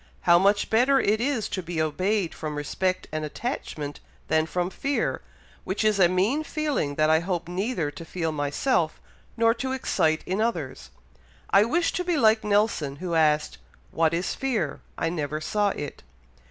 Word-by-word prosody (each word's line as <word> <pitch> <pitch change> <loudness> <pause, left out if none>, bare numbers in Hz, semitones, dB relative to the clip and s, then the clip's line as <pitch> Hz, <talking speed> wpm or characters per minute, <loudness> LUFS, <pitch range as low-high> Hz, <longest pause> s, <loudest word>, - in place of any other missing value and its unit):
How 170 0 +5
much 200 +2 +2
better 255 +5 +4
it 215 -1 +2
is 245 -5 0
to 185 - -3
be 170 -1 -4
obeyed 185 +4 0
from 155 -1 -5
respect 185 +5 -1
and 155 0 -3
attachment 150 - -4 0.3
than 160 0 +2
from 180 +2 -2
fear, 275 +6 -1 0.4
which 190 +4 -2
is 215 -2 +2
a 175 -2 +6
mean 205 - +1
feeling 295 - -1
that 155 +1 +3
I 160 - +5
hope 175 -1 -3
neither 180 -3 -2
to 145 +3 -9
feel 165 -1 -3
myself, 155 - 0 0.4
nor 230 0 +4
to 260 +2 -3
excite 160 -11 +1
in 190 +4 -1
others. 150 - -2 0.6
I 200 +2 +6
wish 335 +8 +1
to 360 - -1
be 350 -2 0
like 220 -4 +4
Nelson, 205 -9 +1
who 175 +3 -5
asked, 155 -2 +2 0.3
'What 160 -1 +2
is 170 +2 -1
fear? 230 - -2 0.2
I 165 - 0
never 155 -3 -3
saw 205 +6 +1
it.'" 145 -6 -6
185 Hz, 170 wpm, -26 LUFS, 155-220 Hz, 0.6 s, a